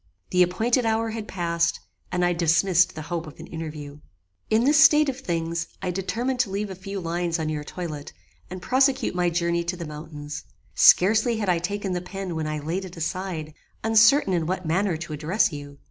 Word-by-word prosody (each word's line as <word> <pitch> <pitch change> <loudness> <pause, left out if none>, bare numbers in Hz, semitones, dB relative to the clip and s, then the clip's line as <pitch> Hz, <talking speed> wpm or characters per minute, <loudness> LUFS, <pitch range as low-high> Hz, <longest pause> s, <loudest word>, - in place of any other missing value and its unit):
The 180 - +3
appointed 220 +8 +2
hour 225 0 0
had 220 -1 -5
passed, 170 -2 0 0.3
and 180 0 +1
I 175 - +2
dismissed 170 +2 +3
the 155 - -6
hope 170 0 -4
of 155 - -12
an 165 - -8
interview. 150 -3 -7 0.5
"In 220 +2 +3
this 295 +3 +6
state 300 -2 +6
of 265 -1 -4
things 170 -5 -2
I 185 -2 -2
determined 235 +8 -2
to 245 -5 +2
leave 200 +1 -3
a - - -6
few 195 +2 -6
lines 170 0 -1
on 160 -1 -2
your 150 -1 -3
toilet, 150 -2 -6 0.4
and 185 0 -8
prosecute 265 +1 +2
my 180 -1 +1
journey 170 0 0
to 175 +1 -3
the 170 - -5
mountains. 150 -1 -7 0.3
Scarcely 220 +5 +5
had 205 -3 -1
I 175 -2 +3
taken 195 +2 -3
the 180 - -2
pen 185 -1 -6
when 160 -1 -2
I 155 0 -2
laid 165 +6 -3
it 180 -2 -10
aside, 165 -2 -4 0.3
uncertain 225 +1 +5
in 165 -3 0
what 185 0 -2
manner 175 +2 +1
to 160 -1 -7
address 165 +8 +1
you. 145 -1 -8
180 Hz, 200 wpm, -25 LUFS, 165-205 Hz, 0.5 s, this